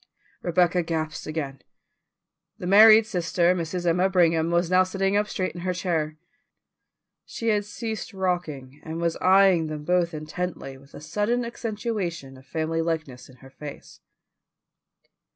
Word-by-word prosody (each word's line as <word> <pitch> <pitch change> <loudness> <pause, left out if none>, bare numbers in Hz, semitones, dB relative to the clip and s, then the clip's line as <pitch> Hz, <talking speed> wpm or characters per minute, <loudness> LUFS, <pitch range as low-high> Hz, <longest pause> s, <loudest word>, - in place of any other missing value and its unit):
Rebecca 175 0 +2
gasped 160 -2 -4
again. 140 -4 -4 1.0
The - - -7
married 215 +3 +8
sister, 175 -3 +1
Mrs. 175 0 -3
Emma 180 +3 +2
Brigham, 165 -3 +3
was 170 0 +1
now 185 0 +6
sitting 195 +1 0
up 210 0 +2
straight 185 -3 -3
in 175 - -8
her 180 0 -2
chair; 160 -4 -2 1.1
she 230 - -4
had 210 -1 +1
ceased 220 +3 -5
rocking, 170 -8 -3
and 160 +1 -5
was 170 -1 0
eyeing 190 -3 +4
them 155 -1 -6
both 175 0 +1
intently 155 -2 -5
with 140 +1 -17
a - - -9
sudden 210 +10 -1
accentuation 210 - -4
of 130 +1 -17
family 160 +2 -1
likeness 160 -7 -4
in 130 - -16
her 135 - -14
face. 145 +1 -10
175 Hz, 145 wpm, -25 LUFS, 155-190 Hz, 1.1 s, married